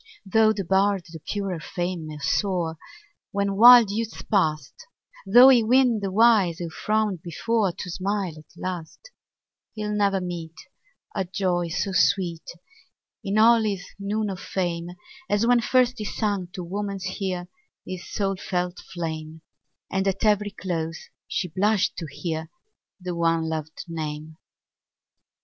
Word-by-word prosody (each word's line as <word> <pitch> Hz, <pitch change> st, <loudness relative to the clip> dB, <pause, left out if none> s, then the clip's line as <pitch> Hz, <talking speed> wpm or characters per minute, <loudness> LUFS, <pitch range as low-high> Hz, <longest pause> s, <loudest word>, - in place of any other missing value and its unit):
Tho' 215 Hz, +3 st, +4 dB
the 205 Hz, -2 st, -2 dB
bard 195 Hz, 0 st, +2 dB
to 165 Hz, -2 st, -10 dB
purer 195 Hz, 0 st, -3 dB
fame 175 Hz, 0 st, -4 dB
may 155 Hz, -1 st, -7 dB
soar, 165 Hz, +2 st, -1 dB, 0.5 s
When 200 Hz, 0 st, -1 dB
wild 235 Hz, 0 st, +9 dB
youth's 225 Hz, +1 st, -4 dB
past; 160 Hz, -7 st, 0 dB, 0.5 s
Tho' 245 Hz, +6 st, +9 dB
he 250 Hz, -3 st, +6 dB
win 245 Hz, 0 st, +4 dB
the 200 Hz, -1 st, -2 dB
wise, 205 Hz, -5 st, +4 dB
who 170 Hz, -2 st, -5 dB
frowned 210 Hz, -1 st, -1 dB
before, 200 Hz, +4 st, 0 dB
To 180 Hz, +1 st, -7 dB
smile 195 Hz, -1 st, -2 dB
at 155 Hz, -1 st, -15 dB
last; 185 Hz, -, -6 dB, 0.6 s
He'll 210 Hz, -1 st, -3 dB
never 200 Hz, -2 st, +2 dB
meet 170 Hz, -3 st, -6 dB, 0.6 s
A 190 Hz, -, -1 dB
joy 180 Hz, -1 st, -1 dB
so 180 Hz, +4 st, -2 dB
sweet, 175 Hz, -3 st, +2 dB, 0.8 s
In 200 Hz, 0 st, -1 dB
all 230 Hz, +1 st, +6 dB
his 200 Hz, -3 st, -2 dB
noon 205 Hz, +1 st, -2 dB
of 185 Hz, -, -6 dB
fame, 175 Hz, -3 st, -3 dB, 0.4 s
As 205 Hz, +2 st, +2 dB
when 245 Hz, 0 st, +4 dB
first 250 Hz, +1 st, +2 dB
he 210 Hz, -, -4 dB
sung 200 Hz, -3 st, -2 dB
to 180 Hz, -, -5 dB
woman's 195 Hz, +1 st, -4 dB
ear 180 Hz, -2 st, -2 dB, 0.4 s
His 185 Hz, -1 st, -7 dB
soul 195 Hz, -2 st, -1 dB
felt 180 Hz, 0 st, -3 dB
flame, 160 Hz, -3 st, -6 dB, 0.5 s
And, 190 Hz, +1 st, 0 dB
at 195 Hz, +3 st, 0 dB
every 210 Hz, -1 st, +3 dB
close, 165 Hz, -5 st, -5 dB, 0.2 s
she 180 Hz, -, -2 dB
blushed 200 Hz, +4 st, +1 dB
to 165 Hz, -, -5 dB
hear 160 Hz, +2 st, -4 dB, 0.5 s
The 180 Hz, -1 st, -4 dB
one 165 Hz, -1 st, +1 dB
lov'd 160 Hz, -1 st, -5 dB
name. 155 Hz, -1 st, -6 dB
190 Hz, 145 wpm, -25 LUFS, 170-210 Hz, 0.8 s, wild